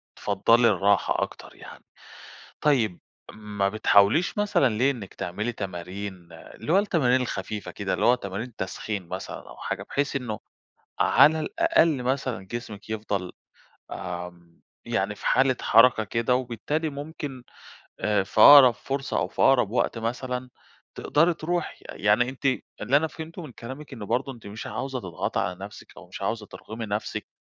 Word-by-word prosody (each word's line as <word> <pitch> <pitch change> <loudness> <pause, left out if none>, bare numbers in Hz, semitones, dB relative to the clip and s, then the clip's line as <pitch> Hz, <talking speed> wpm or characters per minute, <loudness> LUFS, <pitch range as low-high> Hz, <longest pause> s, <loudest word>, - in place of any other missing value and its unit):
بتفضَّلي 120 +1 +3
الراحة 100 -3 +2
أكتر - - -8
يعني. - - -13 0.8
طيب، 120 -11 +2 0.3
ما 105 -2 -2
بتحاوليش 110 - +3
مثلًا 205 -10 +3
ليه 130 +5 +3
إنِّك 110 -8 -8
تعملي 105 +7 -3
تمارين، 95 -2 -6
اللي 85 - -5
هو 190 - +6
التمارين 145 -11 +2
الخفيفة 105 -3 -4
كده، 100 -2 -3
اللي - - 0
هو 125 - +6
تمارين 110 +2 -6
تسخين 95 0 -4
مثلًا 95 +2 -7
أو - - -12
حاجة، - - -4
بحيث 145 0 -2
إنّه 120 -6 -3 0.6
على 160 +2 +5
الأقل 170 - +2
مثلًا 130 -6 -2
جسمِك 110 -1 -7
يفضَل 105 -4 -3 0.6
آمم، 90 -1 -7 0.2
يعني - - -1
في - - -9
حالة 130 -1 +3
حركة 115 0 +5
كده 115 +4 0
وبالتالي 130 +6 -2
ممكن 145 -2 -7 0.6
أ 105 -2 +1
في - - 0
أقرَب 140 -4 +10
فرصة 135 +3 -3
أو 85 - 0
في - - -5
أقرَب 135 -6 +5
وقت 120 - 0
مثلًا 125 +2 -3 0.5
تقدَري 165 +4 +2
ترُوحي. 175 +2 -3
يعني 105 +4 +2
أنتِ، 130 +1 -10 0.4
اللي 140 - +3
أنا 160 +2 0
فهمته 160 +2 -8
من 155 -5 -9
كلامِك 130 +5 -9
إنّه 115 -5 -7
برضه 135 +6 -1
أنتِ 115 -4 -13
مش 105 +2 -7
عاوزة 130 +4 -4
تضغطي 90 -7 -3
على 90 +1 -1
نفسِك 105 - -12
أو - - -12
مش - - -9
عاوزة 110 -2 -2
ترغمي 110 +2 -8
نفسِك 105 +1 -4
120 Hz, 155 wpm, -26 LUFS, 100-135 Hz, 0.8 s, أقرَب